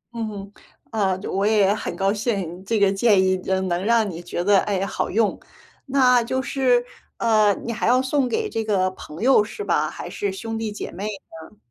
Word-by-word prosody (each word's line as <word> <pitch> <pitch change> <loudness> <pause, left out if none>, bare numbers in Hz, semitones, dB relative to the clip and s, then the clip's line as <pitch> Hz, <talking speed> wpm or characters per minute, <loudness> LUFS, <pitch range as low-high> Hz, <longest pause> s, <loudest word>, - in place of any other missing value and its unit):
嗯 230 -1 -2
哼， 200 -1 -8 0.4
啊， 195 -4 0
就 195 - -6
我 195 +1 0
也 205 -2 +4
很 - - -4
高 195 +1 +1
兴 195 -5 -3
这 215 +2 0
个 200 -1 +4
建 205 0 +3
议， 185 0 +2
嗯， 190 0 0
能 175 +1 -1
让 225 0 +3
你 170 -3 -6
觉 175 0 -4
得， 200 0 +5
哎 205 - -1
呀， 195 - -1
好 - - -3
用。 215 +1 +1 0.5
那 250 -3 +4
就 260 +3 -2
是， 255 -2 +1 0.3
呃， 215 -2 +3
你 235 - -2
还 225 - -2
要 250 +1 +4
送 260 -1 0
给 445 -1 -1
这 225 - -3
个 190 -3 +1
朋 160 -3 -11
友 260 -5 +5
是 325 - -7
吧？ - - +1
还 - - -8
是 200 -1 -3
兄 225 +4 -5
弟 220 -1 -3
姐 205 - -6
妹 200 +4 -5
呢？ 195 -3 -10
210 Hz, 230 characters per minute, -22 LUFS, 195-235 Hz, 0.5 s, 得